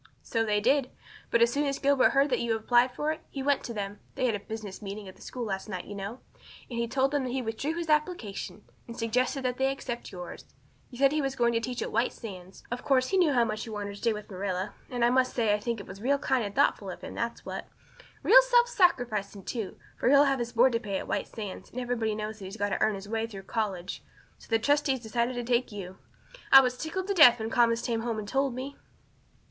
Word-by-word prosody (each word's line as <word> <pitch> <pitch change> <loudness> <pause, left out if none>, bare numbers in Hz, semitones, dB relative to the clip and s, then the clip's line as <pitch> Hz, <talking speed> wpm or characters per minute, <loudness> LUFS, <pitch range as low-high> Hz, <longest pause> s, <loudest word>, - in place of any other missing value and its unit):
"So 225 -1 0
they 210 -1 +1
did. 260 +4 +2 0.4
But 235 0 +4
as 235 0 +2
soon 290 +1 +1
as 275 0 -1
Gilbert 280 -1 +4
heard 275 +1 +2
that 250 - +2
you 235 -1 0
had 220 - -2
applied 245 +2 +4
for 295 +5 -1
it 315 - -5
he 275 - -5
went 285 0 +2
to - - -5
them 205 -2 -5 0.2
they 255 - 0
had 240 - +2
a 205 - -2
business 215 -2 -7
meeting 200 0 -6
at 185 - -10
the - - -20
school 245 -2 -5
last 195 0 -4
night, 185 -3 -4
you - - -8
know 200 +5 -6 0.5
and 235 -1 -2
told 270 +1 +2
them 290 -2 0
that 255 - -3
he 260 +1 -2
withdrew 235 +8 -2
his 340 -1 -3
application, 300 - -1 0.2
and 235 - -8
suggested 250 +4 0
that 250 -1 -1
they 265 0 +2
accept 240 -3 -5
yours. 180 -2 -8 0.4
He 245 - -11
said 275 +1 +4
he 305 0 +1
was 270 -1 -2
going 235 -2 +2
to 230 - +2
teach 245 +2 -3
at - - -5
White 230 +3 +1
Sands. 190 -4 -10
Of 245 0 -4
course 255 -2 +2
he 385 - +2
knew 350 -5 +4
how 240 -2 +4
much 215 +1 -4
you 220 - -6
wanted 205 -1 -4
to - - -9
stay 230 +3 +1
with 210 -1 -6
Marilla, 190 0 -3 0.2
and 245 -3 +1
I 240 - +4
must 255 0 +2
say 225 -4 +2
I 210 - +1
think 230 +1 -3
it 200 - -8
was 195 +1 -10
real 275 +4 +2
kind 265 -3 +1
and 205 -1 -5
thoughtful 280 +2 +2
in - - -6
him, - - -9
that's - - -4
what. - - -5 0.6
Real - - +9
self - - +4
sacrificing, 235 - +1
too, 220 -1 -4 0.2
for - - +2
he'll 280 +1 +7
have 275 -2 +2
his 240 0 -3
board 245 +3 +5
to 230 - +1
pay 200 -3 -3
at - - -6
White - - -1
Sands, 205 -4 -7
and 250 - -6
everybody 235 -3 -1
knows 215 +1 -5
he's 195 +2 -8
got 205 -1 0
to - - -2
earn 215 -1 +3
his 195 0 -8
own 210 - -8
way 225 0 0
through 195 -4 -9
college. 195 -4 -3 0.4
So - - -16
the 225 - +4
trustees 280 +1 +1
decided 235 +2 -1
to 245 - -2
take 240 0 +1
you. 190 -2 -8 0.5
I 270 - +12
was 250 -1 0
tickled 325 +7 -4
to 400 - 0
death 275 -10 +8
when 220 +1 -3
Thomas 235 -1 +3
came 230 -2 0
home 230 -1 -2
and 210 -1 -5
told 270 +1 0
me." 270 +2 -5
235 Hz, 260 wpm, -28 LUFS, 210-265 Hz, 0.6 s, I